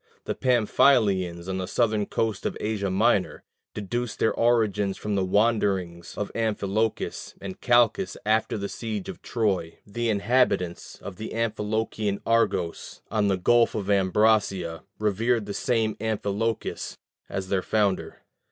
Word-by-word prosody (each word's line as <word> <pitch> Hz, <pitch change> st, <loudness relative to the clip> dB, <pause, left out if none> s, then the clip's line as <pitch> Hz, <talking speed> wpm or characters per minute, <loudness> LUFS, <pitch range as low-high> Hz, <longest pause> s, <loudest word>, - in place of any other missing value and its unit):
The -, -, -1 dB
Pamphylians, 105 Hz, -8 st, +2 dB
on 95 Hz, 0 st, -2 dB
the 90 Hz, -, -3 dB
southern 110 Hz, -1 st, +1 dB
coast 110 Hz, -3 st, -1 dB
of -, -, -4 dB
Asia 105 Hz, -2 st, -1 dB
Minor, 100 Hz, +1 st, +1 dB, 0.3 s
deduced 115 Hz, +3 st, -3 dB
their 110 Hz, -, +2 dB
origin 105 Hz, -5 st, +2 dB
from 105 Hz, -, -4 dB
the 100 Hz, -1 st, +1 dB
wanderings 95 Hz, -4 st, 0 dB
of 105 Hz, -, -3 dB
Amphilochus 110 Hz, -1 st, -1 dB
and 95 Hz, -1 st, -8 dB
Calchas 120 Hz, -, +3 dB
after 110 Hz, +1 st, +1 dB
the 100 Hz, -1 st, -3 dB
siege 110 Hz, -2 st, -5 dB
of -, -, -8 dB
Troy: 95 Hz, -8 st, -1 dB
the 115 Hz, +3 st, -2 dB
inhabitants 100 Hz, -5 st, +1 dB
of 95 Hz, -3 st, -7 dB
the 110 Hz, +1 st, -6 dB
Amphilochian 110 Hz, -2 st, -1 dB
Argos 115 Hz, -7 st, 0 dB
on 105 Hz, -2 st, +2 dB
the 95 Hz, -2 st, +2 dB
Gulf 120 Hz, +6 st, +3 dB
of 100 Hz, -2 st, -1 dB
Ambracia 95 Hz, -3 st, +2 dB, 0.2 s
revered 110 Hz, +2 st, +1 dB
the 100 Hz, -, -5 dB
same 110 Hz, -2 st, 0 dB
Amphilochus 110 Hz, 0 st, -2 dB, 0.3 s
as 95 Hz, -1 st, -4 dB
their 95 Hz, -2 st, +1 dB
founder. 100 Hz, -1 st, -1 dB
105 Hz, 135 wpm, -26 LUFS, 95-115 Hz, 0.3 s, Calchas